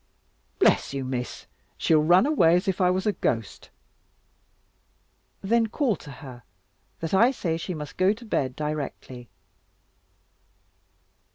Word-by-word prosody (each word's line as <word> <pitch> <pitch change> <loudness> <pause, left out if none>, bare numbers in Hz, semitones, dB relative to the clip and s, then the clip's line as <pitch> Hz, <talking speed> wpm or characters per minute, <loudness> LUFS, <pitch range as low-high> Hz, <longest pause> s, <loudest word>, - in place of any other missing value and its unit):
"Bless - - +2
you, 135 -1 -3
Miss; 125 -1 -5 0.3
she'll 155 -2 +3
run 175 +7 +5
away 175 - +4
as 180 +4 0
if 190 0 -1
I 180 - +4
was 185 +1 0
a 210 - +3
ghost." 115 - -3 1.7
"Then 225 +3 +2
call 235 -1 0
to 150 - -13
her, 130 -3 -11 0.6
that 165 +1 -4
I 225 +6 +5
say 175 -11 -2
she 170 +2 -5
must 150 -2 -8
go 185 +1 +4
to 230 +3 -7
bed 130 - -1
directly." 140 -5 -5
165 Hz, 130 wpm, -25 LUFS, 140-200 Hz, 1.7 s, run